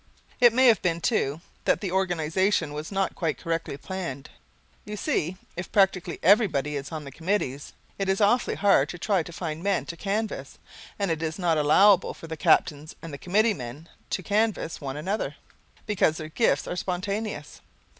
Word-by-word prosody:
It 240 Hz, -2 st, +7 dB
may 255 Hz, +3 st, +4 dB
have 230 Hz, -4 st, +6 dB
been, 170 Hz, -2 st, 0 dB
too, 160 Hz, -, 0 dB, 0.2 s
that -, -, +3 dB
the 195 Hz, -4 st, -3 dB
organization 185 Hz, -2 st, +1 dB
was 150 Hz, +4 st, -6 dB
not 195 Hz, -1 st, 0 dB
quite 160 Hz, -4 st, -2 dB
correctly 165 Hz, -4 st, -3 dB
planned. 165 Hz, -6 st, -6 dB, 0.5 s
You 210 Hz, 0 st, -6 dB
see, 185 Hz, -, -1 dB, 0.2 s
if 175 Hz, +1 st, -6 dB
practically 190 Hz, -3 st, +2 dB
everybody 165 Hz, -, +3 dB
is 140 Hz, +2 st, -5 dB
on 155 Hz, -2 st, -5 dB
the 140 Hz, -, -9 dB
committees, 160 Hz, -4 st, -2 dB, 0.3 s
it 195 Hz, -1 st, -1 dB
is 190 Hz, -, +2 dB
awfully 220 Hz, +4 st, +3 dB
hard 195 Hz, -8 st, +3 dB
to 175 Hz, -, -6 dB
try 195 Hz, +1 st, +1 dB
to 165 Hz, -, -8 dB
find 165 Hz, -2 st, -5 dB
men 195 Hz, 0 st, 0 dB
to 170 Hz, -, -6 dB
canvass, 210 Hz, +4 st, -3 dB, 0.4 s
and 200 Hz, -4 st, 0 dB
it 160 Hz, -1 st, -2 dB
is 160 Hz, -1 st, -2 dB
not 170 Hz, -4 st, +1 dB
allowable 190 Hz, +6 st, +5 dB
for -, -, -11 dB
the 160 Hz, 0 st, -5 dB
captains 155 Hz, -2 st, +2 dB
and 165 Hz, -3 st, -7 dB
the 140 Hz, -, -7 dB
committee 210 Hz, -, +2 dB
men 135 Hz, +2 st, -8 dB, 0.2 s
to 185 Hz, -, -2 dB
canvass 210 Hz, -4 st, 0 dB
one 135 Hz, -1 st, -4 dB
another, 195 Hz, +8 st, -2 dB, 0.5 s
because 185 Hz, -7 st, +2 dB
their 155 Hz, 0 st, -6 dB
gifts 140 Hz, -3 st, +1 dB
are -, -, -3 dB
spontaneous. 190 Hz, -2 st, -4 dB
175 Hz, 180 wpm, -26 LUFS, 155-200 Hz, 0.5 s, It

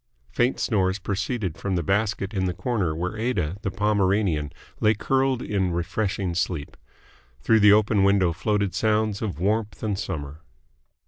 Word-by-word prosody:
Faint 120 Hz, -, +1 dB
snores 95 Hz, -4 st, +1 dB
proceeded 100 Hz, -1 st, -3 dB
from 95 Hz, -2 st, -2 dB
the 85 Hz, -, 0 dB
basket 100 Hz, +2 st, 0 dB
in 95 Hz, -2 st, 0 dB
the 90 Hz, -1 st, -2 dB
corner 95 Hz, -8 st, -1 dB
where 90 Hz, +5 st, -3 dB
Aida, 95 Hz, -8 st, -1 dB
the -, -, -2 dB
Pomeranian, 100 Hz, -6 st, +1 dB, 0.3 s
lay 110 Hz, +1 st, +3 dB
curled 130 Hz, +3 st, 0 dB
in 95 Hz, -4 st, -1 dB
refreshing 95 Hz, +1 st, -2 dB
sleep. 85 Hz, -4 st, -2 dB, 0.7 s
Through 110 Hz, +8 st, +4 dB
the 105 Hz, 0 st, +7 dB
open 105 Hz, -1 st, +3 dB
window 100 Hz, -3 st, +3 dB
floated 100 Hz, +1 st, -1 dB
sounds 110 Hz, 0 st, 0 dB
of 100 Hz, -8 st, -3 dB
warmth 105 Hz, +4 st, -1 dB
and 105 Hz, -3 st, -1 dB
Summer. 75 Hz, -5 st, -5 dB
100 Hz, 150 wpm, -24 LUFS, 90-110 Hz, 0.7 s, the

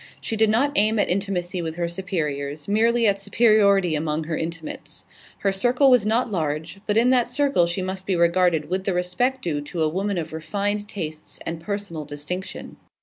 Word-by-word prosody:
She 225 Hz, -, -3 dB
did 220 Hz, 0 st, +3 dB
not 255 Hz, +7 st, +2 dB
aim 215 Hz, +2 st, +3 dB
at 205 Hz, -, +2 dB
intimacy 180 Hz, -1 st, -1 dB
with 160 Hz, -1 st, -4 dB
her 170 Hz, 0 st, -1 dB
superiors; 150 Hz, -5 st, -3 dB
merely 230 Hz, +3 st, +3 dB
at 200 Hz, -2 st, +2 dB
superiority 200 Hz, -6 st, +4 dB
among 155 Hz, +1 st, -1 dB
her 155 Hz, +1 st, -3 dB
intimates. 165 Hz, 0 st, -6 dB, 0.3 s
Her 195 Hz, -, +1 dB
circle 250 Hz, +7 st, +3 dB
was 240 Hz, -5 st, +4 dB
not 230 Hz, +1 st, +1 dB
large, 160 Hz, 0 st, -2 dB
but 210 Hz, 0 st, +1 dB
in 240 Hz, +3 st, +4 dB
that 245 Hz, -2 st, +3 dB
circle 275 Hz, -10 st, +2 dB
she 175 Hz, +2 st, -2 dB
must 190 Hz, 0 st, -5 dB
be 190 Hz, -, +1 dB
regarded 170 Hz, -2 st, +2 dB
with 185 Hz, +3 st, -2 dB
the 195 Hz, -, 0 dB
respect 245 Hz, +9 st, 0 dB
due 150 Hz, -4 st, -1 dB
to 160 Hz, +3 st, -3 dB
a -, -, +3 dB
woman 195 Hz, +4 st, -1 dB
of 160 Hz, -2 st, -4 dB
refined 205 Hz, +6 st, -2 dB
tastes 155 Hz, -7 st, -6 dB
and 165 Hz, 0 st, -4 dB
personal 200 Hz, -4 st, -4 dB
distinction. 150 Hz, +7 st, -6 dB
185 Hz, 190 wpm, -23 LUFS, 165-210 Hz, 0.3 s, superiority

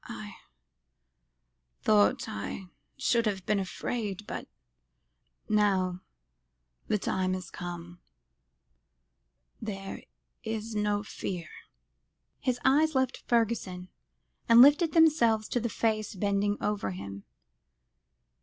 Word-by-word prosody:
"I -, -, -7 dB, 1.5 s
thought 105 Hz, -1 st, +3 dB
I 175 Hz, -, -5 dB, 0.3 s
should 235 Hz, -3 st, +2 dB
have 190 Hz, -3 st, -2 dB
been 210 Hz, -1 st, +2 dB
afraid 205 Hz, +1 st, -3 dB
but -, -, -6 dB, 1.0 s
now 190 Hz, -4 st, +2 dB, 0.9 s
the 210 Hz, -, +2 dB
time 185 Hz, -1 st, 0 dB
has 180 Hz, -2 st, -7 dB
come 175 Hz, 0 st, -7 dB, 1.6 s
there 195 Hz, -2 st, -5 dB, 0.4 s
is 220 Hz, 0 st, -4 dB
no 210 Hz, -1 st, 0 dB
fear." 180 Hz, -4 st, -5 dB, 0.9 s
His 250 Hz, -2 st, -1 dB
eyes 305 Hz, +3 st, +4 dB
left 260 Hz, -1 st, 0 dB
Fergusson, 215 Hz, -6 st, 0 dB, 0.6 s
and 230 Hz, 0 st, +8 dB
lifted 290 Hz, +5 st, +7 dB
themselves 240 Hz, -10 st, +4 dB
to 245 Hz, -, +1 dB
the 235 Hz, 0 st, -2 dB
face 215 Hz, -1 st, -1 dB
bending 200 Hz, +1 st, +1 dB
over 210 Hz, -, -1 dB
him. 100 Hz, +1 st, -7 dB
210 Hz, 100 wpm, -29 LUFS, 185-235 Hz, 1.6 s, and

